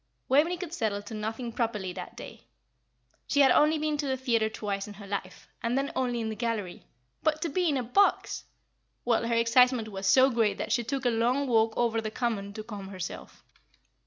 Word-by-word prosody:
Waveney 315 +7 +3
could 340 -2 -6
settle 210 -9 -1
to 205 - -9
nothing 225 +3 -4
properly 210 -6 -2
that - - -8
day; - - -10 0.8
she 285 - +3
had 270 -2 +6
only 305 +1 +4
been 305 0 -1
to 290 -1 -2
the 265 -1 0
theatre 230 -4 +1
twice 200 -2 -4
in 205 - -9
her 200 0 -11
life, 195 -2 -5
and 235 +2 0
then 275 +1 -1
only 245 -2 0
in 225 -1 -2
the 220 - -4
gallery. 220 -6 -3 0.3
But 310 0 +1
to 335 - -1
be 355 +3 +1
in 285 - +1
a 255 - -1
box! 395 - +2 0.6
well, 235 -1 +2
her 235 - +1
excitement 235 0 +4
was 195 -1 -4
so 265 +4 +6
great 225 -4 +1
that - - -4
she 240 - +2
took 265 +3 -3
a - - +5
long 245 +5 +1
walk 225 -2 +2
over 230 -2 +1
the 215 - -3
Common 215 -4 -2
to 215 - -6
calm 205 -3 -8
herself. 185 -2 -7
230 Hz, 210 wpm, -28 LUFS, 215-265 Hz, 0.8 s, had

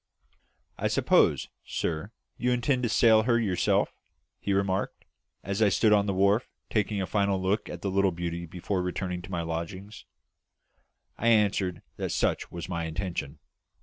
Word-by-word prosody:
"I - - +1
suppose, - - +3 0.2
sir, 85 +6 -3 0.2
you 125 +1 0
intend 125 +2 +1
to 120 - 0
sail 110 0 +5
her 120 +1 +2
yourself?" 95 -6 +1 0.5
he 100 - -2
remarked, 100 0 -1 0.4
as 100 +3 -2
I 105 - +6
stood 105 +3 +4
on 100 -1 +3
the 100 - +1
wharf 100 +5 +3 0.2
taking 105 -2 0
a - - -1
final 100 -1 +1
look 95 +3 0
at 85 - -7
the 100 - -1
little 100 0 +3
beauty 85 0 -4
before 90 +3 -2
returning 90 0 -3
to 85 - -11
my 85 -3 -2
lodgings. 85 +5 -6 1.1
I 115 - 0
answered 100 -6 +2
that - - -2
such - - 0
was 85 -1 -6
my 85 -2 -3
intention. 80 -3 -4
100 Hz, 160 wpm, -28 LUFS, 90-105 Hz, 1.1 s, I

